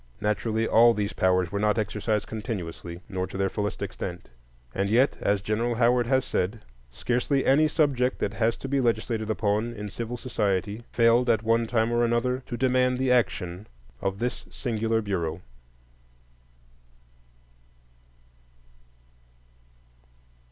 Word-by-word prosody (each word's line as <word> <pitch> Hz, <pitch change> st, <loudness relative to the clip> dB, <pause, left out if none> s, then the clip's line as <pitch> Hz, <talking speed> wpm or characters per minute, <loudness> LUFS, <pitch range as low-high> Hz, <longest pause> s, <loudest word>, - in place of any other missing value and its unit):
Naturally, 110 Hz, +1 st, 0 dB
all 115 Hz, +1 st, +6 dB
these 105 Hz, -1 st, -2 dB
powers 90 Hz, -2 st, +2 dB
were 100 Hz, -, -2 dB
not 105 Hz, +1 st, +2 dB
exercised 105 Hz, 0 st, -1 dB
continuously 90 Hz, -6 st, -6 dB
nor 95 Hz, -2 st, -3 dB
to -, -, -7 dB
their 95 Hz, 0 st, +1 dB
fullest 105 Hz, 0 st, -3 dB
extent; 90 Hz, -2 st, -6 dB, 0.4 s
and 100 Hz, +1 st, -1 dB
yet, 125 Hz, +6 st, +3 dB
as 100 Hz, -1 st, +1 dB
General 115 Hz, +3 st, 0 dB
Howard 120 Hz, 0 st, +3 dB
has 130 Hz, 0 st, +2 dB
said, 105 Hz, +1 st, -2 dB, 0.3 s
"scarcely 125 Hz, -, 0 dB
any 150 Hz, +4 st, +5 dB
subject 140 Hz, -5 st, +1 dB
that 100 Hz, -, -2 dB
has 115 Hz, +1 st, +1 dB
to -, -, -6 dB
be 140 Hz, 0 st, +1 dB
legislated 110 Hz, -2 st, -1 dB
upon 110 Hz, +2 st, 0 dB
in 105 Hz, -1 st, -6 dB
civil 115 Hz, +4 st, -5 dB
society 105 Hz, -3 st, -1 dB
failed, 120 Hz, +1 st, +4 dB
at 115 Hz, -1 st, +2 dB
one 115 Hz, +1 st, +2 dB
time 115 Hz, 0 st, +1 dB
or 120 Hz, 0 st, +2 dB
another, 120 Hz, +2 st, +1 dB
to 120 Hz, -, -4 dB
demand 125 Hz, 0 st, +2 dB
the 130 Hz, 0 st, +1 dB
action 100 Hz, -6 st, 0 dB, 0.3 s
of 95 Hz, 0 st, -1 dB
this 120 Hz, +3 st, -3 dB
singular 115 Hz, -2 st, -1 dB
Bureau." 85 Hz, -5 st, -2 dB
110 Hz, 135 wpm, -26 LUFS, 100-120 Hz, 0.4 s, all